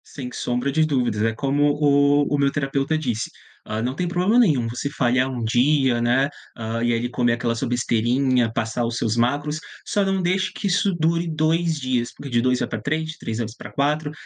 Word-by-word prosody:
Sem 125 -3 -8
sombra 125 +3 -2
de 155 +2 +3
dúvidas. 125 -8 0
É 115 0 +1
como 140 +4 0
o 145 -1 +3 0.2
o - - +3
meu 140 -1 +2
terapeuta 140 +2 -1
disse, 120 -8 -2 0.4
hã, 110 +1 -2
não 125 +3 -2
tem 180 +3 -2
problema 180 +6 +2
nenhum 145 - +3
você 125 +5 -3
falhar 130 -1 +1
1 125 -3 -4
dia, 125 +1 +2
né, 125 +4 +2 0.3
hã, 115 0 -3
e 120 0 +2
aí 120 +1 -1
comer 120 -1 +1
aquela 120 0 -1
sua 120 +3 -2
besteirinha, 120 +1 +1
passar 115 +1 -1
os 115 +1 -3
seus 110 -2 0
macros, 145 +6 0 0.3
só 205 - +1
não 195 -1 0
deixe 185 +1 0
que - - -3
isso 195 +1 +2
dure 170 +1 +1
2 160 +1 +1
dias, 125 -3 -1
porque 140 - -9
de 120 -2 +2
2 125 0 +1
vai - - -1
pra 110 -2 -5
3, 160 +6 -2
de 160 - -13
3 110 - -4
vezes 115 -1 -4
pra - - -10
4, 145 +2 0
135 Hz, 215 wpm, -22 LUFS, 120-155 Hz, 0.4 s, de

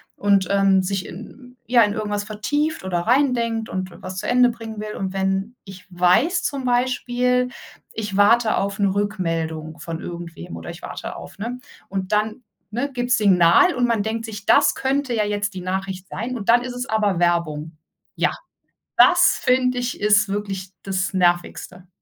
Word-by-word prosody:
und, 200 -2 +2
ähm, 195 -1 +4
sich 190 0 -2
in 250 +6 -11
ja, 240 -2 +5
in 205 0 +1
irgendwas 205 -1 -2
vertieft 290 +8 -2
oder 180 -2 -1
reindenkt 235 -2 +1
und 185 -1 -4
was 185 0 -7
zu - - -4
Ende 245 0 +5
bringen 225 -2 -7
will. 210 0 -6
Und 190 -1 -3
wenn 195 +4 -1
ich 190 -2 -12
weiß 205 - +3
zum 275 -2 -2
Beispiel: 250 0 +1 0.4
Ich 210 -3 -4
warte 220 +2 +4
auf 200 +1 -2
‘ne 200 - +3
Rückmeldung 165 -6 -2
von 165 -1 -6
irgendwem 170 - -8
oder 80 - -7
ich - - -12
warte - - -7
auf, - - -11
ne, 240 +4 -5 0.3
und 190 0 -4
dann, 215 +3 0 0.3
ne, 265 +6 -2
gibt's 245 -1 +1
Signal 195 - +5
und 245 - +2
man 230 -3 +1
denkt 225 +2 -3
sich: 205 -2 -8
„Das - - +5
könnte 270 -1 -1
ja 215 -2 +1
jetzt 205 -1 -2
die 185 - -6
Nachricht 190 0 -4
sein.“ 235 +7 -4
Und 220 -3 -5
dann 240 +1 +5
ist 255 -1 -5
es 250 +1 -5
aber 210 -5 +1
Werbung. 165 -3 0 0.4
Ja, - - +2 0.7
das 355 0 +6
finde 255 -1 +2
ich, 245 0 -3
ist 210 0 +4
wirklich 195 -2 -4
das 190 -1 -2
Nervigste. 180 0 -1
205 Hz, 175 wpm, -22 LUFS, 185-245 Hz, 0.7 s, das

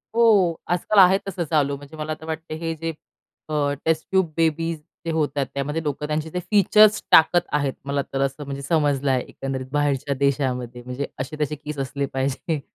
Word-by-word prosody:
हो 205 -8 +5
आज-काल 180 +4 +2
आहे 190 +1 +7
तसं 180 -2 -2
चालू. 145 -3 +2
म्हणजे 145 +2 -12
मला 155 0 -4
आता 160 +1 -6
वाटतंय 160 0 -5
हे 165 0 -3
जे 165 +1 -5
आहे - - -3 0.6
अ, 145 -2 +1
टेस्ट 160 -1 +1
ट्यूब 190 -4 +2
बेबीज 165 0 +1 0.3
जे 165 - -1
होतात, 145 -3 0
त्यामध्ये 150 +4 -2
लोकं 150 0 -3
त्यांचे 155 +1 -2
जे 180 - -3
फीचर्स 210 +1 +5
टाकत 175 +2 +6
आहेत. 140 -2 +1
मला 140 0 0
तर 135 - 0
असं 140 +2 -1
म्हणजे 140 0 -5
समजलंय 140 -3 +1
एकंदरीत 135 -1 -5
बाहेरच्या 145 -1 0
देशामध्ये 130 -3 -1
म्हणजे 125 +3 -4
असे 130 +4 -4
तसे 150 +1 0
केस 150 0 -7
असले 140 +1 -2
पाहिजे. 135 +4 -1
150 Hz, 185 wpm, -23 LUFS, 140-165 Hz, 0.6 s, आहे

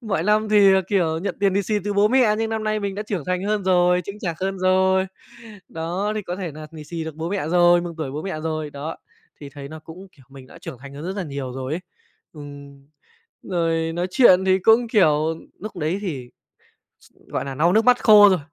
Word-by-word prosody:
mọi 200 -8 -2
năm 210 +3 +2
thì, 205 -2 +6
ờ, 190 - +4
kiểu, 165 -5 +1
nhận 190 +1 -4
tiền 195 -2 +2
lì 200 - +1
xì 215 - -2
từ 205 - -1
bố 205 +1 +3
mẹ 240 -3 +3
nhưng 225 0 -1
năm 220 -1 -3
nay 215 0 -1
mình 200 -1 -3
đã 205 - -4
trưởng 200 -7 -4
thành 180 0 -2
hơn 205 -1 -1
rồi, 180 -1 +3
chững 200 +1 -8
chạc 170 -6 -4
hơn 195 0 -2
rồi. 190 +1 +2 0.6
Đó, 175 +6 -3
thì 215 - -3
có 180 -1 -5
thể 180 -5 -5
nà 155 +1 -9
lì 155 -2 -10
xì 165 +1 -5
được 160 - -7
bố 160 +1 -4
mẹ 195 -6 -2
rồi, 175 0 +4
mừng 175 -1 -6
tuổi 150 -4 -3
bố 150 +3 -5
mẹ 190 -5 -5
rồi. 155 -2 -3
Đó, 145 +3 -6 0.4
thì 145 - -8
thấy 140 0 -9
nó 160 +1 -9
cũng, 165 +5 -12
kiểu, 135 - -21
mình 135 -1 -13
đã - - -15
trưởng 125 - -9
thành 140 +1 -12
hơn 145 - -8
rất 190 +2 -4
nà 200 - -2
nhiều 140 -5 -6
rồi 130 +2 -5
ấy. 165 - -2 0.5
Ừm. 140 -2 -12 0.6
Rồi 165 -2 -1
nói 175 +1 -1
chuyện 190 -4 +5
thì 190 0 +3
cũng, 225 +5 +4
kiểu, 160 -7 +2 0.3
núc 215 -3 -7
đấy 165 +4 -1
thì, 135 -11 -5 0.7
s - - -23 0.2
gọi - - -3
nà, 135 -1 -5
lau 165 +5 +2
nước 220 +3 +3
mắt 250 0 +4
khô 210 -2 +8
rồi, 190 -2 +2
180 Hz, 245 wpm, -22 LUFS, 155-200 Hz, 0.7 s, khô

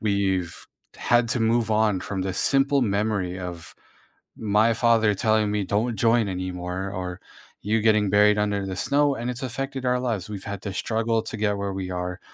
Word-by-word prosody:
we've 95 -4 -1 0.3
had 120 -1 +2
to 120 - +1
move 115 0 +1
on 105 -3 +2
from 95 -1 -4
this 95 -1 -2
simple 140 0 +3
memory 100 -4 -1
of 90 -2 -7 0.6
my 110 +2 +2
father 115 -2 +3
telling 110 +1 +2
me 105 -1 0
"Don't 110 +4 -1
join 115 -2 +2
anymore," 90 +1 -4
or 90 -1 -5 0.4
you 110 +2 0
getting 105 -2 +3
buried 105 0 +5
under 105 -1 0
the 95 -1 -4
snow, 145 +5 +2
and 120 0 -4
it's 125 +1 -6
affected 135 +1 -4
our 125 0 +2
lives, 115 -7 -3
we've 100 -2 -6
had 100 -1 -6
to 100 -2 -4
struggle 115 +1 0
to 110 - -6
get 105 -1 0
where 100 -1 -3
we 95 -1 -4
are, 90 0 -4
105 Hz, 185 wpm, -24 LUFS, 95-115 Hz, 0.6 s, buried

